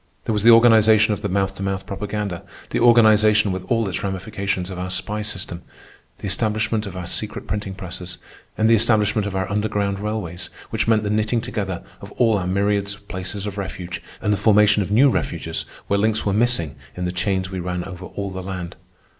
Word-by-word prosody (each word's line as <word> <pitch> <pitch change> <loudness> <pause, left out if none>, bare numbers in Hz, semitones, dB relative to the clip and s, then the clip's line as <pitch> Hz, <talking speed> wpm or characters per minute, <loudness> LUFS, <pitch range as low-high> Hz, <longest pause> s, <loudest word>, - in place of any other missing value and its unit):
There 110 - 0
was 105 - +1
the 115 - +6
organization 110 -2 +6
of 105 - -5
the 100 - -2
mouth 95 +1 0
to - - -7
mouth 95 0 -2
propaganda; 100 -1 -4 0.3
the - - 0
organization, 110 -3 +5
with 95 0 -3
all 115 -1 +1
its 90 - -3
ramifications, 95 -1 -3
of 90 - -6
our 90 0 -3
spy 100 +4 -3
system; 95 -4 -4 0.6
the - - -8
establishment 110 +1 0
of 95 -1 -7
our 90 - -5
secret 105 +4 -3
printing 105 -2 -3
presses; 90 -1 -7 0.4
and 110 +1 +3
the 115 - +6
establishment 110 -2 +2
of 100 - -4
our 95 -1 -1
underground 100 -1 0
railways, 105 -5 -4 0.2
which - - 0
meant 110 -1 +3
the 105 - -1
knitting 110 +2 +1
together 105 -7 -4 0.2
of - - -10
all 115 -4 +3
our 90 - -3
myriads 100 +1 0
of 100 -1 -22
places 95 +2 -4
of 105 -1 -4
refuge, 90 -2 -5 0.2
and 105 - +2
the - - 0
formation 105 0 +5
of 95 - -3
new 120 +7 +5
refuges - - -2 0.2
where 100 - +1
links 110 +1 +1
were 100 - +1
missing 110 - +1 0.2
in 90 - -2
the 90 - -1
chains 95 +1 -1
we 95 - -3
ran 90 0 -3
over 90 0 -8
all 100 -1 -5
the 95 0 -5
land. 90 -2 -6
100 Hz, 205 wpm, -22 LUFS, 95-110 Hz, 0.6 s, the